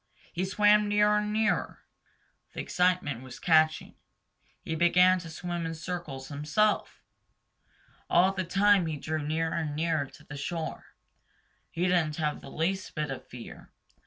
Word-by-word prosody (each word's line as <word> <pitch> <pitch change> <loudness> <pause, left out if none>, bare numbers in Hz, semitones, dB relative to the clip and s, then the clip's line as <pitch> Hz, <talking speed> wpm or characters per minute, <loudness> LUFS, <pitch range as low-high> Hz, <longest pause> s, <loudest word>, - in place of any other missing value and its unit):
He 180 +2 -1
swam 210 +2 +4
nearer 210 0 +3
and 210 0 -2
nearer. 220 +1 0 0.7
The - - -5
excitement 180 -9 0
was 130 -1 -10
catching. 155 -2 +2 0.7
He - - -4
began 180 +3 +4
to 170 -2 -9
swim 175 +1 -4
in 165 0 -4
circles 155 -6 -6
himself. 155 +9 0 1.1
All 180 +2 +4
the 190 -1 -2
time 195 0 +3
he 155 -2 -3
drew 155 +2 -3
nearer 160 +2 -1
and 160 -3 -2
nearer 160 -2 0
to - - -17
the 145 - -9
shore. 160 +3 -5 0.8
He 170 - -3
didn't 175 -4 +2
have 150 -1 -2
the - - -10
least 190 +4 -2
bit 150 -2 -2
of 135 - -7
fear. 120 -2 -11
170 Hz, 150 wpm, -28 LUFS, 155-185 Hz, 1.1 s, swam